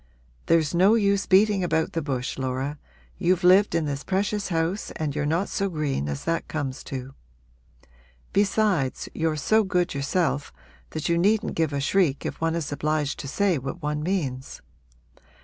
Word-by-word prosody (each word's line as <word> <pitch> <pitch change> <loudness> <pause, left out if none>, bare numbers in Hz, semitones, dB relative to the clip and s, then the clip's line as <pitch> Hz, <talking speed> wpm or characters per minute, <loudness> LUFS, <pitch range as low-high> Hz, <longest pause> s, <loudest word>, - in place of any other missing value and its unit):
There's 160 -2 +3
no 190 +6 +5
use 200 -2 +2
beating 200 0 +4
about 160 -2 0
the 165 - -1
bush, 135 -3 -3
Laura 130 +3 -3 0.4
you've 180 -1 +2
lived 185 +1 +5
in 165 -2 +1
this 140 -1 -3
precious 200 +1 -1
house 165 +3 -1
and 150 -3 -3
you're 150 -1 -1
not 170 +6 0
so 200 0 -1
green 145 - -2
as 70 -1 -4
that 165 0 -1
comes 140 -4 -4
to. 135 0 -6 1.2
Besides, 200 -8 +1
you're 160 -1 0
so 215 +10 +3
good 180 -3 0
yourself 145 +1 -1 0.4
that 155 -1 -4
you 170 -1 +2
needn't 215 +4 +2
give 160 -2 0
a 140 - -1
shriek 145 -1 +1
if - - -5
one 165 0 +1
is 165 -4 -3
obliged 150 0 -1
to 140 - -5
say 185 +2 +1
what 135 +6 -6
one 150 0 -1
means. 150 -7 -3
165 Hz, 165 wpm, -25 LUFS, 145-190 Hz, 1.2 s, no